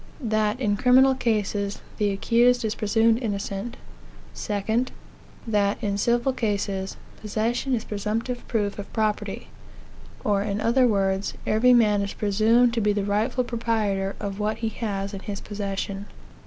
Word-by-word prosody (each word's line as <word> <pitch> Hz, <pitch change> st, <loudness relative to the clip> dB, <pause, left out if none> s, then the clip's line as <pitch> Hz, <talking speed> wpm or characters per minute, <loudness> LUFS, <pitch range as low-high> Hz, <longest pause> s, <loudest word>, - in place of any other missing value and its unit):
That, 215 Hz, 0 st, +1 dB
in 205 Hz, -5 st, +1 dB
criminal 260 Hz, +3 st, +5 dB
cases, 210 Hz, -5 st, -1 dB, 0.2 s
the 205 Hz, -1 st, +2 dB
accused 235 Hz, +4 st, +3 dB
is 215 Hz, -, 0 dB
presumed 225 Hz, +2 st, +2 dB
innocent. 205 Hz, 0 st, -3 dB, 0.6 s
2. 215 Hz, -, -1 dB, 0.6 s
That, 205 Hz, -3 st, 0 dB
in 200 Hz, -1 st, 0 dB
civil 240 Hz, +4 st, +2 dB
cases, 200 Hz, -5 st, -2 dB, 0.2 s
possession 230 Hz, +5 st, -1 dB
is 225 Hz, -, -3 dB
presumptive 220 Hz, +4 st, -3 dB
proof 205 Hz, -3 st, -1 dB
of 200 Hz, -, -7 dB
property; 215 Hz, -2 st, -2 dB, 0.7 s
or, 200 Hz, -1 st, +2 dB
in 205 Hz, 0 st, -2 dB
other 245 Hz, +3 st, +3 dB
words, 195 Hz, -2 st, 0 dB
every 245 Hz, +3 st, +4 dB
man 210 Hz, -4 st, +4 dB
is 200 Hz, 0 st, -4 dB
presumed 225 Hz, +4 st, +3 dB
to 230 Hz, -, 0 dB
be 210 Hz, 0 st, +2 dB
the 205 Hz, -1 st, -1 dB
rightful 220 Hz, +5 st, +1 dB
proprietor 215 Hz, -5 st, -1 dB
of 200 Hz, 0 st, -4 dB
whatever 215 Hz, +2 st, -1 dB
he 225 Hz, -, 0 dB
has 200 Hz, -3 st, -4 dB
in 195 Hz, -, -5 dB
his 200 Hz, 0 st, -5 dB
possession. 200 Hz, -1 st, -4 dB
215 Hz, 145 wpm, -25 LUFS, 200-235 Hz, 0.7 s, criminal